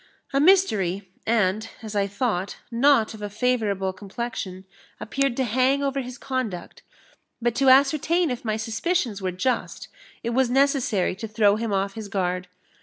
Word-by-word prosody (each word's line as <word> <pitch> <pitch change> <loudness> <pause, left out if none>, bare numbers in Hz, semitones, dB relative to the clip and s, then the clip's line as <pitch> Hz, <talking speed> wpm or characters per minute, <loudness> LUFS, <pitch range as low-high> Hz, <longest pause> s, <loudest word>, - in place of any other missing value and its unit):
A 275 - +3
mystery, 210 - +3 0.2
and, 220 -1 +1
as 215 -1 -6
I 200 -1 +2
thought, 200 -3 -2
not 235 -2 +3
of 215 - -10
a 205 - -4
favourable 210 -4 0
complexion, 195 -1 -6 0.3
appeared 275 +1 -1
to 265 - +2
hang 260 +4 +2
over 275 0 0
his 250 0 -8
conduct; 255 -9 -4 0.6
but 240 -1 0
to 270 -1 +4
ascertain 305 +5 +4
if 250 +2 -4
my 215 -2 -1
suspicions 225 - -1
were 185 -1 -1
just, 230 +7 -2 0.3
it 235 - -1
was 255 0 +2
necessary 255 -8 +2
to 225 - -5
throw 210 -1 +3
him 225 0 -3
off 195 0 0
his 220 -1 -7
guard. 180 -2 -2
225 Hz, 160 wpm, -24 LUFS, 200-260 Hz, 0.6 s, to